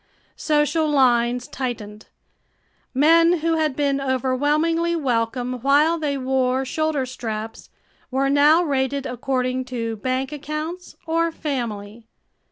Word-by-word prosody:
Social 300 +1 +1
lines 245 -3 +2
tightened. 215 -5 -6 0.8
Men 330 +5 +5
who 330 +1 +1
had 310 -4 0
been 280 -1 0
overwhelmingly 290 +6 +1
welcome 250 -3 -1
while 295 +5 +3
they 290 -3 -1
wore 260 0 0
shoulder 310 -1 -1
straps 225 -3 -6 0.4
were 270 +1 0
now 295 +5 +5
rated 275 -2 -1
according 255 0 -2
to 230 -3 -4
bank 255 +4 -2
accounts 305 +4 -6
or 330 0 +1
"family." 230 -8 -5
270 Hz, 110 wpm, -22 LUFS, 250-305 Hz, 0.8 s, Men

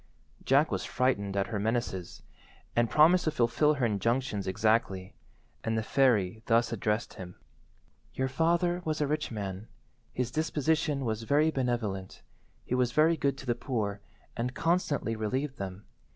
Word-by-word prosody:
Jack 140 +4 +3
was - - -1
frightened 100 -6 0
at 100 - +2
her 105 - -3
menaces, 110 -5 -2 0.5
and 120 -1 +2
promised 160 +8 +5
to - - +3
fulfil 150 +2 +2
her 130 -3 0
injunctions 110 0 0
exactly, 100 -2 0 0.5
and 115 0 0
the 110 - 0
fairy 110 -6 +2
thus 115 0 +3
addressed 110 +1 -1
him— 90 -1 -9 0.8
"Your 130 - 0
father 170 +5 +1
was 155 -2 -2
a 150 - +2
rich 150 +1 -1
man. 100 -1 -5 0.4
His 125 -1 -2
disposition 155 -1 0
was 110 -1 -1
very 145 +7 +3
benevolent. 120 -8 -2 0.4
He - - -3
was 125 -1 +1
very 160 +2 +4
good 140 -3 0
to 140 - -9
the 120 - +1
poor, 105 -6 -3 0.3
and 125 +2 -3
constantly 160 -9 0
relieved 130 +6 -2
them. 95 +1 -6
120 Hz, 150 wpm, -29 LUFS, 105-145 Hz, 0.8 s, promised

